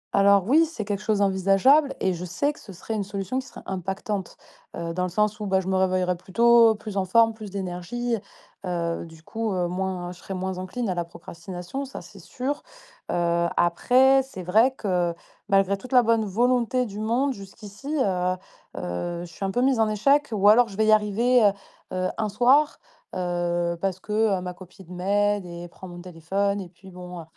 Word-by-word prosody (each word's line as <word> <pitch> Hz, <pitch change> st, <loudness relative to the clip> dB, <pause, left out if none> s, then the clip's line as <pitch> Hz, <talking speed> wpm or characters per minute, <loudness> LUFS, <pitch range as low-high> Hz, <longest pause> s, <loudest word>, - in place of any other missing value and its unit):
Alors 200 Hz, -1 st, +5 dB
oui, 315 Hz, +6 st, +5 dB
c'est 225 Hz, -10 st, -6 dB
quelque 205 Hz, 0 st, -3 dB
chose 210 Hz, -1 st, 0 dB
envisageable 200 Hz, +10 st, +4 dB
et 190 Hz, -1 st, +1 dB
je 175 Hz, +1 st, -6 dB
sais 285 Hz, -, -1 dB
que -, -, -17 dB
ce 200 Hz, -, -12 dB
serait 190 Hz, +5 st, -6 dB
une 210 Hz, -2 st, -1 dB
solution 200 Hz, +5 st, -3 dB
qui 260 Hz, -, -8 dB
serait 235 Hz, -, -12 dB
impactante, 190 Hz, +1 st, -4 dB, 0.4 s
heu, 165 Hz, 0 st, -4 dB
dans 180 Hz, -, -2 dB
le 180 Hz, -, 0 dB
sens 210 Hz, +3 st, 0 dB
où, 210 Hz, -, -4 dB
bah, 190 Hz, 0 st, +2 dB
je 190 Hz, -, -5 dB
me 190 Hz, -, +1 dB
réveillerais 185 Hz, -1 st, +1 dB
plus 180 Hz, +1 st, -17 dB
tôt, 235 Hz, 0 st, +6 dB
plus 210 Hz, -1 st, -7 dB
en 190 Hz, -, +1 dB
forme, 225 Hz, +4 st, +4 dB
plus 215 Hz, -2 st, -9 dB
d'énergie, 195 Hz, +6 st, -3 dB, 0.5 s
heu, 170 Hz, -2 st, -2 dB
du 160 Hz, 0 st, -16 dB
coup, 225 Hz, +1 st, -3 dB
heu, 180 Hz, -1 st, 0 dB
moins 180 Hz, -1 st, -3 dB
je 180 Hz, -, -12 dB
serais 195 Hz, -, -6 dB
moins 185 Hz, 0 st, -3 dB
encline 215 Hz, +5 st, -4 dB
à 185 Hz, -, 0 dB
la 175 Hz, -1 st, -2 dB
procrastination. 175 Hz, +8 st, -7 dB
Ça, 265 Hz, -, -8 dB
c'est 185 Hz, +3 st, -14 dB
sûr, 270 Hz, -, -4 dB, 0.5 s
heu, 170 Hz, 0 st, +1 dB
après, 255 Hz, +10 st, +4 dB
c'est 225 Hz, -9 st, -9 dB
vrai 220 Hz, +8 st, +4 dB
que, 175 Hz, -4 st, 0 dB, 0.3 s
malgré 195 Hz, 0 st, +3 dB
toute 255 Hz, -, -11 dB
la 250 Hz, -, +7 dB
bonne 225 Hz, -1 st, +2 dB
volonté 245 Hz, +4 st, +1 dB
du 205 Hz, -1 st, -7 dB
monde 250 Hz, +5 st, +1 dB
jusqu'ici, 210 Hz, +8 st, -7 dB
heu 185 Hz, -4 st, +1 dB, 0.4 s
heu, 170 Hz, -, -4 dB
je 170 Hz, -, -14 dB
suis -, -, -7 dB
un 195 Hz, -, 0 dB
peu 245 Hz, -, 0 dB
mise 265 Hz, -3 st, +2 dB
en 220 Hz, -1 st, +3 dB
échec 275 Hz, +7 st, +2 dB
ou 205 Hz, -1 st, +2 dB
alors 230 Hz, +3 st, +7 dB
je 195 Hz, -1 st, -11 dB
vais 220 Hz, -, +3 dB
y 215 Hz, -, +4 dB
arriver, 215 Hz, +4 st, +3 dB
heu 205 Hz, -, +6 dB, 0.5 s
heu, 185 Hz, 0 st, 0 dB
un 215 Hz, -1 st, 0 dB
soir, 260 Hz, +8 st, +3 dB, 0.4 s
heu, 175 Hz, -1 st, -1 dB
parce 190 Hz, -1 st, -1 dB
que, 210 Hz, -, -10 dB, 0.3 s
heu, -, -, -5 dB
ma 180 Hz, 0 st, -5 dB
copine 180 Hz, 0 st, -13 dB
m'aide 205 Hz, +2 st, +1 dB
et 175 Hz, 0 st, -8 dB
prend 185 Hz, +2 st, -11 dB
mon 175 Hz, 0 st, -9 dB
téléphone 195 Hz, +4 st, -2 dB
et 180 Hz, -, -9 dB
puis 190 Hz, +2 st, -16 dB
bon, 180 Hz, -1 st, -9 dB
heu -, -, -10 dB
195 Hz, 210 wpm, -25 LUFS, 180-225 Hz, 0.5 s, la